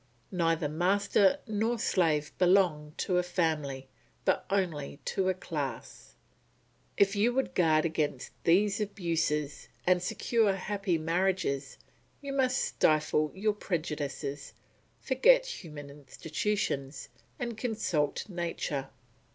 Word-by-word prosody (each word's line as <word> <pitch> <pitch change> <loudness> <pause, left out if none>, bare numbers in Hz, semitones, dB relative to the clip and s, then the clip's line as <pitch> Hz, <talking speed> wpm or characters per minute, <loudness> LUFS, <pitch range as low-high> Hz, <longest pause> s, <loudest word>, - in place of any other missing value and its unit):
Neither 165 -4 +1
master 195 - +3
nor 220 +1 0
slave 155 -8 +1
belongs 175 -5 +3
to 180 -2 +1
a - - +3
family, 155 -7 -1 0.4
but - - +2
only 165 -8 -1
to 190 -1 0
a 185 - +1
class. 145 -9 -6 0.8
If 200 +1 +4
you 215 +4 +3
would 265 - 0
guard 160 -3 +3
against 150 -5 -2
these 195 +5 +3
abuses, 165 -7 -1 0.2
and 180 0 +3
secure 210 +2 +1
happy 195 -2 -1
marriages, 165 -4 -1 0.4
you 280 -1 -5
must 260 -2 +2
stifle 155 0 +2
your 210 +2 +1
prejudices, 150 -7 -4 0.5
forget - - +4
human 150 - -8
institutions, 145 0 -3 0.3
and 235 -1 -4
consult 210 - -1
nature. 165 -7 -3
175 Hz, 110 wpm, -30 LUFS, 150-200 Hz, 0.8 s, If